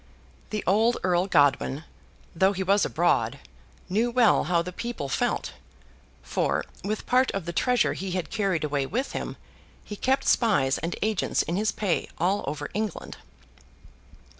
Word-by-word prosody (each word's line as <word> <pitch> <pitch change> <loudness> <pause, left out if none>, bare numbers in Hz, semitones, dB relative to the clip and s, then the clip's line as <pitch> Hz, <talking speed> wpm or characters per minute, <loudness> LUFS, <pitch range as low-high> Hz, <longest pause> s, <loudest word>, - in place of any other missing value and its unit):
The 210 -1 -3
old 220 +5 +3
Earl 180 0 +2
Godwin, 145 -3 +2 0.5
though 190 +4 +3
he 190 0 -2
was 200 +2 +3
abroad, - - +1 0.5
knew 220 +6 +1
well 240 -2 +4
how 170 -1 +2
the 180 +1 -7
people 235 - -4
felt; - - -1 0.7
for, - - -1 0.2
with 210 +2 -3
part 255 +1 +3
of 195 -4 -3
the 170 - -4
treasure 250 +4 +2
he 195 - -5
had 185 -2 -3
carried 195 -7 0
away 145 -2 -1
with 255 - -2
him, - - -5 0.5
he 210 - -7
kept 265 +5 0
spies 170 - +3
and 165 +2 -3
agents 215 -2 +1
in 170 - -3
his 210 +2 +1
pay 200 -5 -1
all 190 +5 +1
over 145 0 -4
England. 215 -4 -4
195 Hz, 155 wpm, -26 LUFS, 170-220 Hz, 0.7 s, well